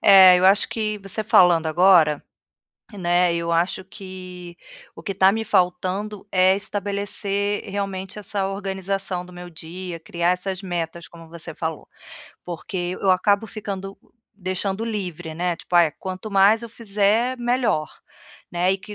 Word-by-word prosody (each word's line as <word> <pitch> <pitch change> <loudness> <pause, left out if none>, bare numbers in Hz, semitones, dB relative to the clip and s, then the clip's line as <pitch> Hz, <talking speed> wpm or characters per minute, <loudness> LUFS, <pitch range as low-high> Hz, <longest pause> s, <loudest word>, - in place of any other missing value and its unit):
É, 190 -2 +9
eu 180 - +1
acho 195 +2 +5
que, 215 -2 -2
você 195 +2 -4
falando 180 -7 +5
agora, 160 -2 +4 0.7
né, 175 -2 +2
eu 170 0 -1
acho 175 +2 0
que 185 -2 -10 0.4
o - - -12
que 200 - -3
está 190 0 +5
me 220 +1 -2
faltando 190 +2 0
é 185 +1 +4
estabelecer 200 0 -2
realmente 195 0 -4
essa 200 -1 -2
organização 195 -2 -3
do 180 - -14
meu 180 0 -9
dia, 170 +2 -7
criar 170 +2 -1
essas 185 +1 -2
metas, 170 -2 -4
como 165 -1 -14
você 165 -2 -8
falou. 160 -1 -5 0.6
Porque 175 +1 -4
eu 195 - +3
acabo 200 +3 +2
ficando 195 -2 -6 0.4
deixando 190 +2 -3
livre, 180 -7 -4
né, 175 0 -1
tipo: 175 - -8
"Ai, 170 -3 +6
quanto 190 +3 -6
mais 200 +4 +5
eu 235 - -7
fizer, 220 +3 +1
melhor", 240 -10 0 0.6
né, 180 +2 +2
e 195 - -3
190 Hz, 145 wpm, -23 LUFS, 175-200 Hz, 0.7 s, É